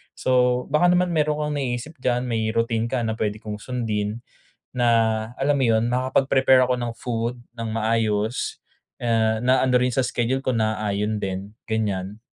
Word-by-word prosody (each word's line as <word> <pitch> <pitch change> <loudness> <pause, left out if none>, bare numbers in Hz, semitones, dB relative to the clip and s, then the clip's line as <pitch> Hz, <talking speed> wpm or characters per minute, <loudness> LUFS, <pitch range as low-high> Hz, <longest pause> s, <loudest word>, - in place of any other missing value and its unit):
So, 125 -1 +2
baka 150 +4 +4
naman 180 0 +3
mayro'n 150 -2 +1
kang 150 0 -2
naiisip 125 +4 -3
diyan, 125 -1 0
may 115 -3 -1
routine 115 0 +1
ka 125 -1 -1
na 110 0 -2
puwede 105 -1 0
kong 105 -1 -5
sundin 110 -2 -3 0.5
na, 120 -1 +3 0.5
alam 145 +1 +2
mo 135 - +1
yun, 115 0 +3
makapag-prepare 130 +1 +3
ako 125 - +2
ng 120 -1 -3
food 120 0 -2 0.2
nang 115 -1 -4
maayos, 110 0 0 0.4
eh, 110 -2 +1
na 130 +3 +3
ano 130 -1 +2
rin 125 0 +1
sa 130 - +2
schedule 125 +2 -1
ko, 130 - +1
naaayon 110 -2 -1
din, 95 +2 -4
ganyan? 105 -2 -2
120 Hz, 165 wpm, -23 LUFS, 110-130 Hz, 0.5 s, baka